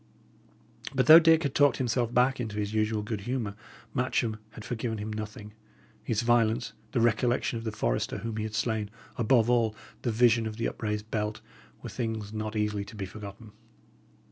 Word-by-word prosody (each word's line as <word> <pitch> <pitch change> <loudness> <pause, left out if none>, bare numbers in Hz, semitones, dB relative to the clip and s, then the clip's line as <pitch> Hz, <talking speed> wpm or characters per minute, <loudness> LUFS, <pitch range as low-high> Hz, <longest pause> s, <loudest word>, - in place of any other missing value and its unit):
But 130 -1 +3
though 160 +5 +11
Dick 165 0 +5
had 140 -2 -1
talked 145 -1 +4
himself 120 -2 0
back 125 +2 +3
into 110 -3 -4
his 105 0 -2
usual 110 0 +1
good 105 -1 -4
humour, 115 -2 -3 0.4
Matcham 120 -3 0
had 110 - -9
forgiven 115 -1 -3
him 105 +1 -4
nothing. 105 0 -7 0.5
His 115 0 0
violence, 115 -1 +2 0.2
the - - 0
recollection 120 +1 +1
of 115 - -9
the 110 - -1
forester - - -1
whom 115 -1 -4
he 110 - -1
had 110 0 -4
slain 110 -3 -1 0.3
above 115 0 +3
all, 115 -3 +2 0.3
the 120 - 0
vision 115 0 +4
of 110 0 -6
the 115 - 0
upraised 105 0 -4
belt, 105 -1 -2 0.4
were - - -5
things 110 -3 -4
not 110 0 -4
easily 105 -1 0
to 110 - -11
be 100 -2 -4
forgotten. 105 +2 -10
110 Hz, 180 wpm, -28 LUFS, 105-120 Hz, 0.5 s, though